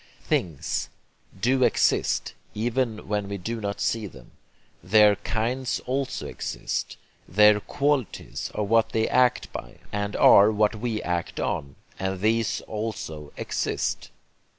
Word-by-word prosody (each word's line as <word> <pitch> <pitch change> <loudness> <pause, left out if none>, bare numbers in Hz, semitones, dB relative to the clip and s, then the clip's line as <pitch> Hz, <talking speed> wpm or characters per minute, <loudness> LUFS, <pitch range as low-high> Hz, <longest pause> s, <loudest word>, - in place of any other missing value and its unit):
'Things' 80 -6 -1 0.5
do 130 +4 +2
exist, - - +2 0.2
even 115 0 -1
when 105 -1 -1
we 100 - -3
do 115 +5 -4
not 100 -1 -3
see 110 -2 0
them. 65 -8 -15 0.5
Their 105 +1 +6
'kinds' 120 +3 -2
also 135 +1 -2
exist. - - -4 0.3
Their 105 +2 +6
'qualities' 140 0 -2
are 105 - 0
what 115 +2 +2
they 110 0 +2
act 125 -1 +2
by, - - -7 0.2
and 100 0 -2
are 100 +2 +7
what 105 0 +2
we 110 0 -3
act 85 -1 -2
on; 70 -1 -2 0.2
and 95 0 -2
these 110 +3 +1
also 105 -9 -5
exist. - - -2
105 Hz, 130 wpm, -25 LUFS, 100-115 Hz, 0.5 s, are